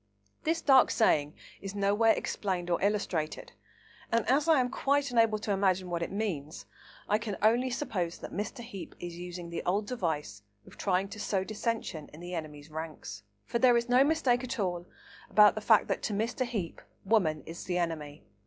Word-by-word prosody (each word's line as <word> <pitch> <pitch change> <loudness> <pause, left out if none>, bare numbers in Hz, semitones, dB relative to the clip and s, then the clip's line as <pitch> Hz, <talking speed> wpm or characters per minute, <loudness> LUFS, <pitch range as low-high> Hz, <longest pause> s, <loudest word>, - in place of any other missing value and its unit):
This 325 +1 +1
dark 265 -4 +6
saying 150 -9 +2 0.3
is 195 0 -6
nowhere 205 +3 +3
explained 180 -3 -2
or 170 - +1
illustrated, 195 -6 -1 0.6
and 230 -1 +1
as 285 +4 +3
I 320 -4 +5
am 250 0 0
quite 280 0 +1
unable 225 -2 +3
to 210 0 -3
imagine 190 -2 +1
what 170 -1 -1
it 170 - -3
means, 155 - -3 0.4
I 210 - +2
can 210 -3 -4
only 240 +4 +4
suppose 185 -10 -2
that - - -9
Mr. 215 +6 -4
Heape 215 -6 -9
is 175 -1 -6
using 175 -1 -7
the 170 - -3
old 200 +4 0
device 160 - -3 0.2
of - - -15
trying 190 0 0
to 210 - -8
sow 195 -2 0
dissension 215 -6 -3
in 155 - -11
the 175 +1 -7
enemy's 155 -2 -6
ranks. 155 -10 -7 0.2
For 235 - -1
there 245 -1 +6
is 235 +1 -1
no 250 +2 +6
mistake 275 -5 +2
at 255 +1 -4
all 175 -3 -2 0.4
about 210 -1 +7
the 215 - -5
fact 215 0 +4
that, - - -1
to 215 - -2
Mr. 230 +5 -1
Heape, 205 -9 -4 0.2
woman 170 -9 +2
is 165 +1 -8
the 180 -1 -1
enemy. 155 -4 -3
200 Hz, 190 wpm, -30 LUFS, 170-230 Hz, 0.6 s, about